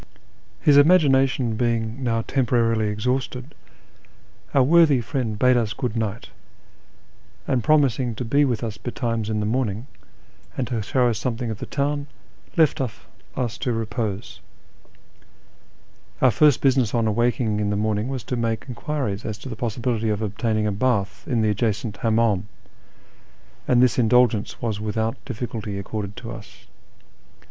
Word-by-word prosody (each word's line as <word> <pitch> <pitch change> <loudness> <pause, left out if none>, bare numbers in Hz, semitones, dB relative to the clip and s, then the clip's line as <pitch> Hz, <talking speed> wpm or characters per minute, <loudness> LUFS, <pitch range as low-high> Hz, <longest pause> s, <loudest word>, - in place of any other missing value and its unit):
His 145 -2 +5
imagination 135 -6 +4
being 115 +1 -1
now 115 -2 0
temporarily 115 -4 +1
exhausted, 125 +5 -2 1.0
our 135 - +4
worthy 155 -1 +5
friend 120 -3 -3
bade 125 +3 +4
us 115 -2 0
good 125 -4 -3
night; 110 -1 -3 1.2
and, 125 -3 +1
promising 135 -6 +2
to 125 - -4
be 140 +6 +3
with 125 -4 0
us 110 -2 -5
betimes 115 -3 -3
in 110 -1 -1
the - - -1
morning, 115 -1 -1 0.7
and 130 - 0
to 115 -4 -1
show 125 +4 +1
us 115 -3 -1
something 120 -1 -2
of 105 - -6
the - - -6
town, 145 0 -1 0.5
left 160 -4 +3
us 120 0 -6
to 125 - -1
repose. 110 -2 -3 1.8
Our 130 - +5
first 150 +1 +4
business 130 -5 +2
on 115 -1 +2
awaking 110 -1 +1
in 105 -1 0
the 100 - 0
morning 105 +1 0
was 130 -3 -4
to 125 - -3
make 115 -2 -2
enquiries 125 -5 -3
as 105 -2 -4
to 130 - -9
the 115 - -5
possibility 115 -1 -1
of 105 +1 -1
obtaining 110 +1 -1
a 105 - +1
bath 100 -5 -1
in 115 -3 +1
the 105 - +2
adjacent 105 0 -2
licmimdm, 110 -4 +2 1.2
and 125 0 +5
this 130 0 +2
indulgence 120 -2 +3
was 110 -3 -2
without 110 +1 -2
difficulty 110 -5 -5
accorded 100 0 -5
to - - -7
us. - - -11
115 Hz, 150 wpm, -23 LUFS, 110-130 Hz, 1.8 s, His